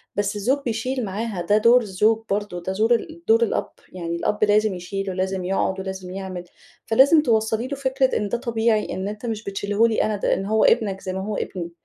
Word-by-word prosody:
بس 205 0 -1
الزوج 240 +7 +1
بيشيل 245 +2 -2
معاها؛ 200 -2 -4
ده 210 - +5
دور 235 +3 +5
الزوج 215 +2 +1
برضه، 200 -3 -2
ده 190 - -2
زور 220 +4 +3
ال 320 +7 -6
دور 225 +1 +5
الأب، 230 - -1 0.2
يعني 170 -2 -4
الأب 210 +5 -1
لازم 210 0 +3
يشيل 195 +2 -4
ولازم 190 0 -2
يقعد 190 0 0
ولازم 190 -1 -6
يعمل. 185 -2 -6 0.4
فلازم 280 +7 +5
توصلي 220 -2 +1
له 280 - -4
فكرة 265 -1 +1
إن 210 -1 -2
ده 240 - 0
طبيعي، 225 -2 0
إن 190 +1 -3
أنتِ 210 +3 -6
مش 220 -2 -3
بتشيله 200 +2 +1
لي 225 - +1
أنا، 215 - 0
ده 200 - 0
إن 195 - -2
هو 220 +2 +2
ابنك 200 -5 +2
زي 185 - -4
ما 190 - -3
هو 210 0 -3
ابني. 170 -2 -4
210 Hz, 215 wpm, -23 LUFS, 190-230 Hz, 0.4 s, ده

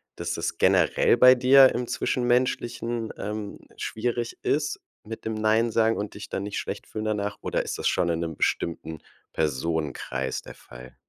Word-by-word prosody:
dass 85 0 -3
das 85 0 -3
generell 95 -4 +3
bei 125 0 +8
dir 130 +1 +7
im 125 +1 -1
Zwischenmenschlichen, 120 -2 -1
ähm, 105 -1 -5 0.2
schwierig 120 +1 -3
ist 150 +1 0 0.2
mit 110 +1 -8
dem 110 0 -2
nein 110 +2 +2
sagen 115 0 +2
und 105 0 -5
dich 105 - -8
dann - - -3
nicht 100 0 -4
schlecht - - -5
fühlen 110 0 -5
danach, 105 -1 -2
oder - - -1
ist - - -4
das - - -1
schon 85 - +1
in 85 0 -1
'nem 80 -2 -4
bestimmten 80 -2 -2 0.3
Personenkreis 75 0 -2
der - - -12
Fall? 60 +1 -13
110 Hz, 170 wpm, -26 LUFS, 85-120 Hz, 0.3 s, bei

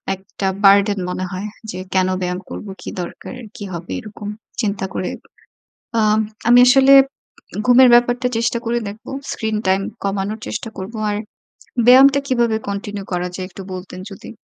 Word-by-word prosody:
একটা 190 +1 -5 0.2
বার্ডেন 200 0 +5
মনে 185 +1 -3
হয়, 190 +2 -4 0.2
যে 185 - -6
কেন 185 -1 +3
ব্যায়াম 180 0 -2
করবো, 210 - -7
কি - - -6
দরকার, 175 - -8 0.2
কী - - -8
হবে? 170 +1 -7
এরকম 215 -1 -9 0.3
চিন্তা 200 -3 -1
করে, 180 - -2 0.9
আম 215 0 +3 0.3
আমি 240 +1 +7
আসলে 270 +2 +6 0.7
ঘুমের 250 +1 +7
ব্যাপারটা 245 +1 +3
চেষ্টা 230 +1 0
করে 235 +1 0
দেখব। 210 +3 -10 0.3
Screen 220 -1 -2
time 190 +1 +2 0.2
কমানোর 200 +2 -2
চেষ্টা - - -4
করব। 190 +4 -6 0.2
আর 205 - -1 0.7
ব্যায়ামটা 270 +3 +7
কিভাবে 235 -4 +2
continue 200 0 -5
করা 180 0 -1
যায়, 185 - -4
একটু 195 - -10
বলতেন 185 0 -8
যদি? 195 - -10
205 Hz, 155 wpm, -19 LUFS, 190-235 Hz, 0.9 s, আমি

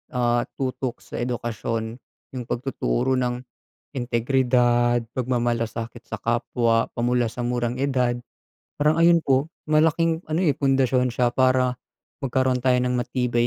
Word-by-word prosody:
ah, 120 -1 +1
tutok 130 -1 -3
sa - - -7
edukasyon. 115 -1 -3 0.4
Yung 125 - -3
pagtuturo 130 - -1
ng 125 0 -2 0.5
integridad, 120 -1 +2 0.2
pagmamalasakit 120 -2 -2
sa 110 - -5
kapwa 115 0 +1
pa - - -6
mula 120 -1 +1
sa 120 +1 -4
murang 120 0 -1
edad. 125 -3 +1 0.6
Parang 150 +2 +2
ayun 170 0 +5
po, 135 0 +2 0.2
malaking 160 +1 +3
ano, 155 +3 0
eh, 150 -6 +3
pundasyon 130 -2 +1
siya 120 -1 +2
para 130 0 +2 0.4
magkaroon 130 -1 +1
tayo 125 0 +2
ng 125 0 0
matibay 120 -1 0
125 Hz, 130 wpm, -24 LUFS, 120-130 Hz, 0.6 s, ayun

